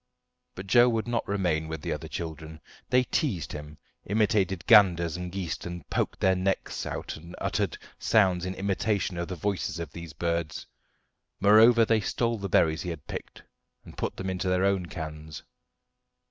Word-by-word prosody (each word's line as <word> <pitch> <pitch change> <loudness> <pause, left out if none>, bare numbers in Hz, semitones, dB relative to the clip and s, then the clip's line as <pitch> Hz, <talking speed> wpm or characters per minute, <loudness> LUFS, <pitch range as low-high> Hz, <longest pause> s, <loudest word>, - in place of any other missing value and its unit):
But 95 - -7
Joe 120 +5 +6
would 115 -1 -1
not 120 -1 -1
remain 90 -6 0
with 80 -2 -6
the - - -1
other 75 +2 -6
children. 80 -1 -6 0.3
They 125 0 +4
teased 105 - -1
him, 75 0 -8 0.3
imitated 100 -3 +1
ganders 90 -7 +5
and 90 0 -5
geese, 90 -3 -3
and 85 -3 -7
poked - - 0
out - - -40
their 95 0 +4
necks 95 +1 -2
and 85 +3 -6
uttered - - -1 0.2
sounds 95 -5 +3
in 95 +1 -3
imitation 100 -1 -1
of 85 - -3
the 90 - -5
voices 95 -2 -2
of 85 -4 -6
these 85 -1 -9
birds. 85 0 -2 0.7
Moreover, 110 +4 +6
they 110 -1 +2
stole 115 +3 -1
the 100 0 -4
berries 80 -2 +3
he 90 - -4
had 80 -4 -7
picked, - - -8 0.4
and - - -12
put - - -3
them 95 - -4
into 95 0 -2
their 90 +1 +2
own 95 -3 +1
cans. 80 -3 -7
90 Hz, 175 wpm, -27 LUFS, 85-100 Hz, 0.7 s, Joe